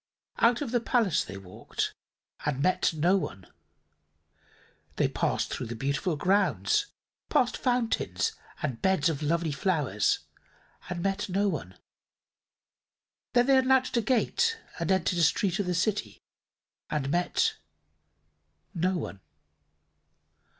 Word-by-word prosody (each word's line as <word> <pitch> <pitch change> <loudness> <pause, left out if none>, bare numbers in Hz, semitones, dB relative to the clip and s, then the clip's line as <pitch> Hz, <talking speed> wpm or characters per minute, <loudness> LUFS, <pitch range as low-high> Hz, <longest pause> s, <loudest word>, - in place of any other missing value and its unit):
Out 235 +2 +4
of 250 - -5
the 245 - +2
palace 230 - +2
they 95 - -8
walked, 95 -1 -4 0.5
and 145 -3 -1
met 185 - +3
no 170 +4 +2
one. 95 - -5 1.5
They - - +2
passed - - -1
through - - -4
the 120 - -5
beautiful 140 - -1
grounds, 205 - +2 0.4
past 245 - +2
fountains 245 -3 0 0.3
and 130 -6 -2
beds 190 -5 +3
of 155 -2 -3
lovely 165 +1 0
flowers, 140 - +1 0.7
and 175 -1 -3
met 195 +1 -1
no 200 +3 +1
one. 95 - -5 1.6
Then 245 0 +5
they 270 0 +5
unlatched 260 0 +3
a 235 - +3
gate 450 - +1 0.2
and 170 +2 0
entered 180 -1 +1
a - - +3
street 175 +4 +2
of 200 - -1
the 180 - 0
city, 205 +4 -1 0.7
and 140 -2 -1
met 175 +2 +1 1.2
no 180 +2 +1
one. 100 - -5
180 Hz, 125 wpm, -28 LUFS, 150-230 Hz, 1.6 s, Then